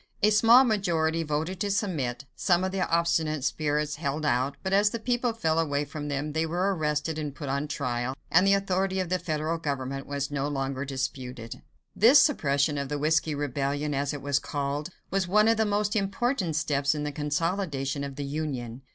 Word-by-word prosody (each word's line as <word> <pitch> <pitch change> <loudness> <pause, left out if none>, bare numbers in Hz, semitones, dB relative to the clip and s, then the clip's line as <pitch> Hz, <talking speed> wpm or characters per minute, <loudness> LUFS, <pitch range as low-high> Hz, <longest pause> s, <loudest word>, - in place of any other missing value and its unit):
A 210 - +6
small 230 +4 +7
majority 170 -8 +1
voted 160 +4 -2
to 205 - -1
submit. 150 - -1
Some 180 -1 +2
of 190 - -1
the 190 -1 -1
obstinate 160 -3 +1
spirits 150 +1 -1
held 145 +2 -2
out, 135 +1 +1
but 190 - -1
as 205 +1 +5
the 230 - -3
people 245 +1 0
fell 165 -8 0
away 145 -2 0
from 150 0 -6
them, 145 +1 -3
they 160 +1 +1
were 180 +5 0
arrested 150 0 -1
and 145 -2 -4
put 145 -3 -6
on 140 +2 -1
trial, 125 -3 -2 0.2
and 185 +4 +5
the 195 - +5
authority 190 -1 0
of 185 -2 -2
the 185 0 +1
federal 160 -1 -2
government 135 -3 -3
was 140 0 -3
no 140 -1 -1
longer 135 -1 -2
disputed. 130 -3 -5 0.3
This 240 +7 +7
suppression 145 - +2
of 140 -1 -4
the 150 - -2
"Whiskey 155 +1 +1
Rebellion," 145 +1 -2
as 140 0 -1
it 145 -2 -6
was 140 0 +1
called, 145 +2 -3 0.2
was 195 -1 0
one 210 +4 +4
of 225 0 +4
the 220 - +2
most 205 +1 0
important 200 - 0
steps 145 -1 +1
in 150 - -3
the 150 - -2
consolidation 150 -1 -2
of 140 -1 -6
the 145 0 -4
Union. 135 -5 -4
150 Hz, 195 wpm, -27 LUFS, 140-185 Hz, 0.3 s, small